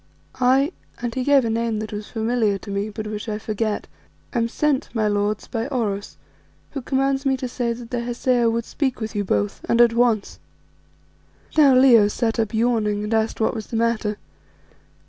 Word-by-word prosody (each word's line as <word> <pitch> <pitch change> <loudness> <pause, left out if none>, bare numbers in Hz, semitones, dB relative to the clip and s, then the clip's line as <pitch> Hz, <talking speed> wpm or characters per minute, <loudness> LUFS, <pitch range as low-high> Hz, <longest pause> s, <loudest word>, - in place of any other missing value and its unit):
"I" 265 +5 +3 0.3
and 240 -1 -3
he 255 - -2
gave 275 -2 +4
a - - 0
name 230 -1 -1
that 215 0 -5
was 210 0 -6
familiar 225 -2 0
to 200 - -9
me, 200 +2 -2
but 215 +1 -6
which 210 +1 -5
I 210 - -2
forget 215 0 -2 0.5
"am 235 -3 +1
sent, 280 +2 0
my 215 -1 +2
lords, 205 +1 0
by 230 0 -3
Oros, 215 -7 -3 0.5
who 275 - -4
commands 270 +1 0
me 270 -2 +1
to 255 - -4
say 240 -1 -2
that 235 0 -10
the 245 - -1
Hesea 240 0 +1
would 230 0 -1
speak 265 -4 -2
with 220 -1 -4
you 205 - 0
both 105 - -1
and 235 - +3
at 240 -1 +6
once." 235 -3 +1 1.2
Now 285 -4 +6
Leo 245 -5 +7
sat 225 +2 -1
up 220 -2 0
yawning 220 -3 +1
and 210 +2 -2
asked 220 0 0
what 220 - +1
was 220 -2 -6
the 230 - -3
matter. 225 -2 0
230 Hz, 190 wpm, -22 LUFS, 215-250 Hz, 1.2 s, Leo